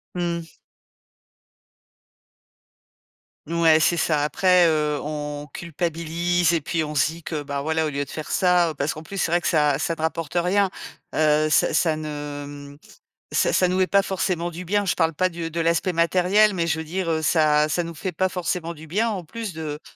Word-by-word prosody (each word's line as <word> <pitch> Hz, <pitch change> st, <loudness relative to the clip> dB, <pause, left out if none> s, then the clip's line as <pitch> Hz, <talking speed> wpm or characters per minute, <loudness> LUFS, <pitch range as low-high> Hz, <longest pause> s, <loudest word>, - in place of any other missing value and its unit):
Mmh. 170 Hz, -2 st, -3 dB, 2.9 s
Ouais, 165 Hz, -1 st, +4 dB
c'est 160 Hz, +2 st, +3 dB
ça. 155 Hz, -3 st, +1 dB
Après, 180 Hz, +4 st, +4 dB
heu, 150 Hz, -2 st, +1 dB
on 150 Hz, -1 st, -5 dB
culpabilise 170 Hz, +1 st, -1 dB
et 165 Hz, -, 0 dB
puis 160 Hz, +2 st, -1 dB
on 150 Hz, 0 st, -5 dB
se 140 Hz, -, +4 dB
dit 170 Hz, +1 st, -10 dB
que, 150 Hz, -2 st, -4 dB
bah 140 Hz, -1 st, -4 dB
voilà, 160 Hz, +2 st, 0 dB
au -, -, -1 dB
lieu 140 Hz, 0 st, -2 dB
de 135 Hz, -, -12 dB
faire 155 Hz, -, -6 dB
ça, 180 Hz, -2 st, +3 dB
heu, -, -, -8 dB
parce 145 Hz, 0 st, -2 dB
qu'en 155 Hz, -, -8 dB
plus, 195 Hz, +4 st, -7 dB
c'est 170 Hz, -, +1 dB
vrai 175 Hz, +1 st, +3 dB
que -, -, -3 dB
ça 150 Hz, -4 st, +3 dB
ça 160 Hz, +3 st, -1 dB
ne 160 Hz, -, -8 dB
rapporte 160 Hz, -1 st, -2 dB
rien. 185 Hz, +3 st, +2 dB, 0.4 s
Heu, 155 Hz, 0 st, +3 dB
ça -, -, +3 dB
ça 160 Hz, -3 st, +2 dB
ne, 155 Hz, 0 st, -6 dB
hem, 145 Hz, -1 st, -7 dB, 0.6 s
ça -, -, +2 dB
ça 185 Hz, -, +3 dB
nous 180 Hz, +1 st, 0 dB
met 185 Hz, -1 st, +2 dB
pas 200 Hz, 0 st, +4 dB
forcément 180 Hz, -3 st, -2 dB
du 175 Hz, +2 st, -7 dB
bien. 205 Hz, +3 st, +1 dB
Je 185 Hz, -, +1 dB
parle 165 Hz, -1 st, +1 dB
pas 185 Hz, +4 st, +1 dB
du 165 Hz, -2 st, -5 dB
de 165 Hz, +1 st, -3 dB
l'aspect 170 Hz, +2 st, +1 dB
matériel, 185 Hz, +5 st, +3 dB
mais 170 Hz, -2 st, -1 dB
je 160 Hz, -, 0 dB
veux 160 Hz, -, -4 dB
dire, 175 Hz, +2 st, -3 dB
heu, 160 Hz, -1 st, +1 dB
ça 155 Hz, -1 st, +3 dB
ça 155 Hz, +4 st, 0 dB
nous 170 Hz, 0 st, -7 dB
fait 180 Hz, +4 st, -4 dB
pas 185 Hz, +3 st, +1 dB
forcément 175 Hz, -2 st, -3 dB
du 160 Hz, 0 st, -12 dB
bien 210 Hz, +9 st, 0 dB
en 190 Hz, -5 st, -4 dB
plus 220 Hz, +4 st, -6 dB
de, 155 Hz, -2 st, -5 dB
165 Hz, 210 wpm, -23 LUFS, 155-180 Hz, 2.9 s, Ouais